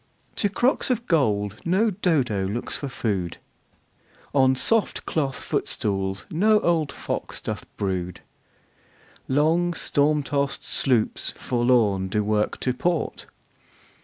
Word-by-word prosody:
To 205 - +2
crocks 245 +8 +1
of 240 -2 0
gold 110 - +1
no 195 +6 +2
Dodo 140 - 0
looks 110 +5 -4
for 140 - -4
food. 100 -8 -2 1.0
On 130 -2 +4
soft 225 - +3
cloth 140 -5 -1
footstools 95 -2 -2
no 210 +6 +4
old 160 -4 +1
fox - - -5
doth - - -5
brood. 90 -3 -3 1.1
Long 165 +5 +2
storm 150 0 +2
tost 140 0 -2
sloops 125 -5 0
forlorn 120 -6 +2
do 105 +3 0
work 105 0 0
to 125 - 0
port. 170 +5 -2
135 Hz, 115 wpm, -24 LUFS, 105-170 Hz, 1.1 s, On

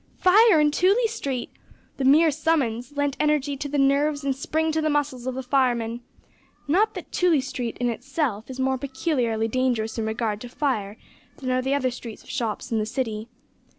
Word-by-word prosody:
Fire 405 -1 +6
in 300 0 +4
Tooley 395 +10 +3
Street! 280 - -3 0.5
The 275 - -2
mere 305 +4 +6
summons 275 -5 0
lent 285 -1 0
energy 300 -2 +1
to 285 +1 -4
the 290 - -1
nerves 285 +2 +2
and 275 -1 0
spring 315 +4 -1
to 315 0 0
the 310 - +1
muscles 285 -4 -1
of 260 - -2
the 265 - -4
firemen. 245 -3 +1 0.7
Not 415 +8 +2
that - - -8
Tooley 350 -5 +3
Street 250 -3 -4
in 245 - +1
itself 245 -2 -3
is 260 0 -7
more 265 0 +1
peculiarly 260 -5 -1
dangerous 230 -2 -1
in 220 - -1
regard 220 -2 -2
to 245 - -7
fire 225 -7 -2 0.4
than 255 -2 -3
are 255 0 +1
the 265 +2 0
other 260 -3 0
streets 235 -2 -9
of - - -10
shops 235 -2 -3
in 225 - +1
the 215 - 0
City. 225 -3 -3
265 Hz, 190 wpm, -24 LUFS, 240-295 Hz, 0.7 s, Fire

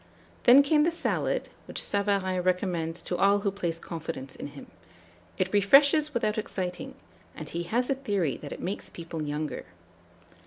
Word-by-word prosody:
'" - - -29
Then 260 +4 +9
came 300 +1 +4
the 335 - +2
salad, 335 - -1 0.2
which - - -3
Savarin 200 -2 0
recommends 175 -2 -1
to 180 - -2
all 200 +1 +4
who 200 -1 0
place 175 -4 -3
confidence 160 -5 -6
in - - -6
him. - - -11 0.7
It 185 +1 -1
refreshes 280 +9 +5
without 215 -2 0
exciting; 205 +6 -4 0.4
and 155 - -7
he 170 +3 -4
has 240 +7 0
a - - +2
theory 205 - -1
that 145 - -9
it - - -7
makes 190 +3 -4
people 165 -1 -7
younger. 150 0 -3
195 Hz, 165 wpm, -28 LUFS, 170-240 Hz, 0.7 s, Then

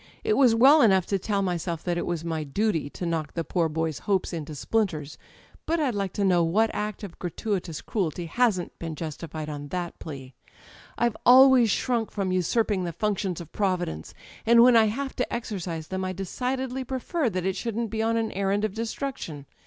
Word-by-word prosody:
It 430 0 +2
was 250 - +5
well 275 +6 +7
enough 190 -6 +4
to 195 - -1
tell 200 +1 -1
myself 170 -3 -2
that 175 -1 -1
it 175 - -2
was 170 -2 -2
my 160 -2 -2
duty 160 0 -1
to 175 - -6
knock 160 -3 -2
the 165 - -1
poor 165 +1 0
boy's 160 -1 -2
hopes 190 -2 +1
into 155 -2 -5
splinters 155 - -1
â€" - - -30 0.5
but 335 +1 +1
I'd 280 -6 +1
like 200 -2 -2
to 205 - -1
know 180 -3 +4
what 215 +7 +2
act 210 0 -4
of 190 -4 -9
gratuitous 180 -2 -3
cruelty 175 -4 -2
hasn't 200 -1 0
been 165 -2 -5
justified 155 0 -6
on 145 -1 -6
that 175 +2 -4
plea? 135 -4 -8 0.6
I've 235 -2 +1
always 255 -2 +7
shrunk 235 +1 0
from 195 -3 -2
usurping 185 +2 +1
the 175 - -2
functions 195 -2 -1
of 170 - -10
Providence, 180 - -2 0.3
and 235 +1 +6
when 250 -1 +6
I 225 -1 +7
have 265 +6 -3
to 250 - 0
exer 235 -3 -3
cise 165 -2 -5
them 190 0 -3
I 185 0 -2
decidedly 255 +7 -3
prefer 265 +3 -1
that 185 -3 -3
it 190 -1 0
shouldn't 230 +1 -3
be 220 - -1
on 225 +1 +1
an 225 -1 -1
errand 200 +2 0
of 210 - -3
destruction. 225 - -5
195 Hz, 200 wpm, -26 LUFS, 165-230 Hz, 0.6 s, well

